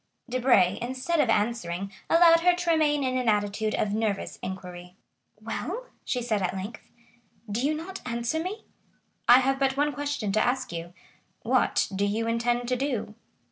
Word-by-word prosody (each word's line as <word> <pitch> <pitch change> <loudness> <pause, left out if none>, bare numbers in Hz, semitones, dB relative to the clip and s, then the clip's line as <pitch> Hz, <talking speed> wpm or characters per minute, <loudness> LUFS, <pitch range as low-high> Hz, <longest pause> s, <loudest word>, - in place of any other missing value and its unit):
Debray, 240 -7 +3
instead 260 +7 -1
of 270 -6 +3
answering, 200 -4 -1 0.2
allowed 335 0 +7
her 355 +1 +4
to 350 -1 0
remain 295 -3 +2
in 255 0 0
an 245 -2 +1
attitude 210 +1 0
of 205 -1 -1
nervous 215 -2 -2
inquiry. 180 -1 -7 0.4
"Well?" 335 - -4 0.2
she 250 -2 -2
said 220 -4 0
at 185 0 -1
length, 200 +4 -6 0.7
"do 230 +5 -1
you 300 +2 +1
not 360 +5 -7
answer 235 +5 -2
me?" 395 +6 -5 0.6
"I 245 +2 +8
have 270 +1 +1
but 270 0 +1
one 295 +1 +1
question 285 -6 -2
to 215 +2 +2
ask 250 -6 -1
you,—what 175 +1 -2
do 200 - 0
you 220 +3 -1
intend 240 +1 0
to 255 - +2
do?" 250 -5 -2
240 Hz, 165 wpm, -27 LUFS, 205-290 Hz, 0.7 s, I